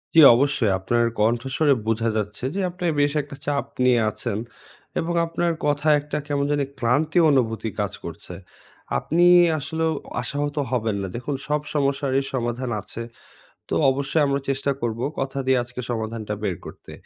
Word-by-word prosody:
জী, - - +8 0.2
অবশ্যই। 130 -5 +2
আপনার 120 +5 +1 0.2
কণ্ঠশুনে 130 +7 +2
বোঝা 115 +1 +1
যাচ্ছে 105 +4 -3
যে, 200 - -1
আপনি 180 0 -6
বেশ 145 0 +3
একটা 140 0 -10
চাপ 145 -1 0 0.2
নিয়ে 125 -2 +5
আছেন। 100 - -4 0.6
এবং 170 +1 -1
আপনার 170 +1 0
কথায় 150 +1 +3
একটা 150 +1 -4
কেমন 140 -1 0
জানি 145 -1 +1 0.2
ক্লান্তি 145 +8 +2
অনুভূতি 115 -4 +1
কাজ - - -1
করছে। - - -8 0.6
আপনি 170 - +2 0.3
আসলেও 160 +3 -1 0.3
আশাহত 145 0 -3 0.2
হবেন 110 -4 0
না। 95 - -3
দেখুন 135 +4 -3
সব 150 0 +1
সমস্যারই 140 -1 +1
সমাধান 120 0 -2
আছে। 115 - -8 0.7
তো - - -1 0.2
অবশ্যই 140 +3 +1
আমরা 140 0 0
চেষ্টা 135 +1 0
করবো, 120 +1 -2 0.2
কথা 135 +1 -3
দিয়ে 130 -1 +4
আজকে 125 +1 -8
সমাধানটা 110 -2 -3
বের 95 -5 -1
করতে। - - -11
135 Hz, 155 wpm, -23 LUFS, 115-145 Hz, 0.7 s, জী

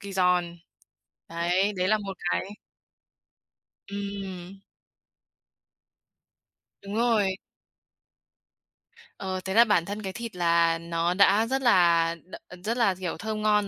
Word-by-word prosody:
kỳ 200 -1 -8
giòn, 180 -2 +1 0.7
đấy, 175 +5 0
đấy 185 +1 0
là 215 - +3
một 195 -2 -6 0.2
cái. 200 - -2 1.4
Ừm. 195 -2 -7 2.2
Đúng 200 +1 -7
rồi. 220 -5 +2 1.8
Ờ, 190 -1 -4
thế 190 - -2
là 230 +3 +7
bản 205 -7 +2
thân 205 +3 -5
cái 190 -2 -5
thịt 230 -2 -7
là 170 -1 +2
nó 170 +1 -1
đã 200 +3 +4
rất 265 +2 -1
là 170 -7 +4
đ 185 - -10 0.3
rất 230 +4 -2
là, 200 -6 +2
kiểu, 180 -4 -4
thơm 215 +3 -4
ngon 210 -1 +2
195 Hz, 125 wpm, -26 LUFS, 175-210 Hz, 2.2 s, là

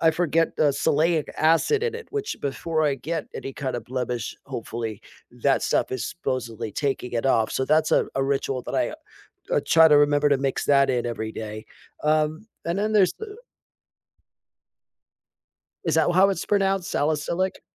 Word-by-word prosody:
I 160 - +5
forget, 165 0 +1
uh, 150 -2 +4
salicylic 155 +3 +1
acid 165 - +3
in 470 -1 -1
it, 465 0 -8
which, 425 -1 -3
before 155 +3 -2
I 145 - +2
get 155 +4 -4
any, 135 - -6
kind 130 -2 -3
of, 115 - -6
blemish, 125 -2 -3
hopefully, 115 -2 -5 0.4
that - - +3
stuff - - 0
is 130 - -2
supposedly 120 -9 -4
taking 135 -2 -2
it 120 +2 -1
off, 115 -4 +2
so 130 - 0
that's 155 +2 +2
a - - +3
a 135 - +2
ritual 135 -2 -1
that - - -6
I - - 0 0.6
I - - +3
try 160 0 +7
to 150 - +6
remember 145 0 +3
to 140 - +5
mix 135 0 -1
that 140 -1 +4
in 120 -1 0
every 110 -2 -4
day. 110 0 -7 0.4
Um, 155 +5 +1 0.2
and 170 +3 -1
then 215 +2 0
there's 195 -4 +4
the 435 -1 -8 2.5
Is - - +1
that - - +3
how 190 +3 +5
it's 195 - -2
pronounced, 195 -2 +1
salicylic? 160 +5 -1
145 Hz, 170 wpm, -24 LUFS, 130-170 Hz, 2.5 s, try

